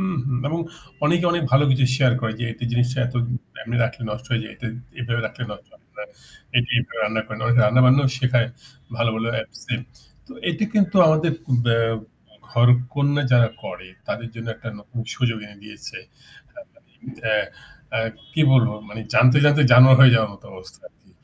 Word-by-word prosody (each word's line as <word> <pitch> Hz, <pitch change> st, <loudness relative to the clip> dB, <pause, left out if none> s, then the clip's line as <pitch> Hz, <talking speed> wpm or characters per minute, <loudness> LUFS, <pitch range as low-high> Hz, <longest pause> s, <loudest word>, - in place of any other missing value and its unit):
উহু। 150 Hz, -9 st, -2 dB, 0.2 s
এবং 165 Hz, -, -2 dB, 0.5 s
অনেকে 170 Hz, +3 st, +2 dB
অনেক 170 Hz, -2 st, -1 dB
ভালো 140 Hz, +2 st, +5 dB
কিছু 130 Hz, 0 st, +2 dB
শেয়ার 130 Hz, -3 st, +3 dB
করে 110 Hz, -1 st, -2 dB
যে -, -, -1 dB
একটা 120 Hz, -, -8 dB
জিনিসটা 125 Hz, +2 st, 0 dB
এত 125 Hz, -, -7 dB, 0.5 s
এমনি 120 Hz, +1 st, -4 dB
রাখলে 120 Hz, +1 st, -6 dB
নষ্ট 125 Hz, +4 st, -7 dB
হয়ে 115 Hz, -2 st, 0 dB
যায়। 110 Hz, -, -11 dB
তা 120 Hz, -, -5 dB, 0.3 s
এভাবে 120 Hz, -1 st, -2 dB
রাখলে 125 Hz, +3 st, -7 dB
নষ্ট -, -, -12 dB
হয় -, -, -24 dB, 0.2 s
না। -, -, -5 dB, 0.5 s
এইযে 120 Hz, 0 st, +1 dB
এভাবে 125 Hz, -, -5 dB
রান্না 110 Hz, +1 st, -1 dB
করে 110 Hz, -, -7 dB
না। -, -, -7 dB
অনেকে 120 Hz, 0 st, +4 dB
রান্নাবান্নাও 130 Hz, +2 st, +4 dB
শেখায় 125 Hz, -2 st, +1 dB, 0.5 s
ভালো, 115 Hz, -1 st, +1 dB
ভালো 115 Hz, +1 st, -2 dB
অ্যাপসে। 110 Hz, +2 st, -5 dB, 0.5 s
তো 265 Hz, -, -13 dB, 0.2 s
এটা 175 Hz, +5 st, -1 dB
কিন্তু 195 Hz, -2 st, +2 dB
আমাদের 155 Hz, +1 st, +2 dB, 0.3 s
বা 115 Hz, -1 st, +2 dB, 0.7 s
ঘরকন্যা 125 Hz, +4 st, +2 dB
যারা 120 Hz, -2 st, +5 dB, 0.2 s
করে 90 Hz, +1 st, -8 dB, 0.2 s
তাদের 115 Hz, +2 st, -4 dB
জন্য 115 Hz, 0 st, -8 dB
একটা 115 Hz, 0 st, -9 dB
নতুন 115 Hz, +4 st, -8 dB
সুযোগ 115 Hz, -4 st, -1 dB
এনে 105 Hz, 0 st, -16 dB
দিয়েছে। 105 Hz, 0 st, -10 dB, 1.3 s
আ -, -, +3 dB, 0.6 s
আ -, -, +1 dB, 0.3 s
কি 155 Hz, -, +1 dB
বলবো? 120 Hz, -4 st, +3 dB
মানে 110 Hz, +2 st, -8 dB
জানতে, 125 Hz, +3 st, +5 dB
জানতে 145 Hz, 0 st, +4 dB
জানোয়ার 130 Hz, +1 st, +9 dB
হয়ে 130 Hz, -1 st, +9 dB
যাওয়ার 110 Hz, -2 st, +1 dB
মত 100 Hz, -, -18 dB
অবস্থা 95 Hz, 0 st, -13 dB
আরকি। -, -, -33 dB
125 Hz, 175 wpm, -21 LUFS, 115-135 Hz, 1.3 s, জানোয়ার